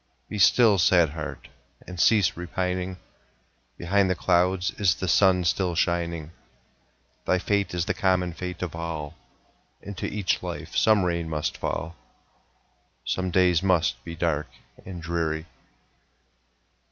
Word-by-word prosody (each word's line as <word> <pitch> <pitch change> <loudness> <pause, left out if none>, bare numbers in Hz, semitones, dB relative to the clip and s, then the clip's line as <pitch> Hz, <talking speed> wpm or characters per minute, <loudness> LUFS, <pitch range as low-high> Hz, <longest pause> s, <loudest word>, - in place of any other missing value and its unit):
Be 105 - -4
still, 100 +2 +5
sad 85 -2 +4
heart! 75 -1 -7 0.4
and 90 -1 -9
cease 105 -2 +4
repining; 90 +1 -3 0.8
Behind 95 +2 +1
the 90 - +1
clouds 90 +2 +1
is 95 -4 +3
the 95 - -4
sun 90 0 +4
still 90 0 0
shining; 85 -2 -1 1.0
Thy 95 - +3
fate 100 0 -1
is 85 -1 0
the - - 0
common 95 -4 +1
fate 90 0 -6
of 85 -3 -5
all, 80 -3 -5 0.7
Into 100 -2 -6
each 100 -3 -1
life - - -6
some 110 -3 +4
rain 85 -2 -1
must 75 -1 -2
fall, 85 +1 -4 1.1
Some 95 0 -1
days 90 -2 +3
must 90 -3 +1
be 85 0 -7
dark 80 -3 -1 0.4
and 90 -3 -8
dreary. 80 -1 -2
90 Hz, 130 wpm, -25 LUFS, 85-95 Hz, 1.1 s, still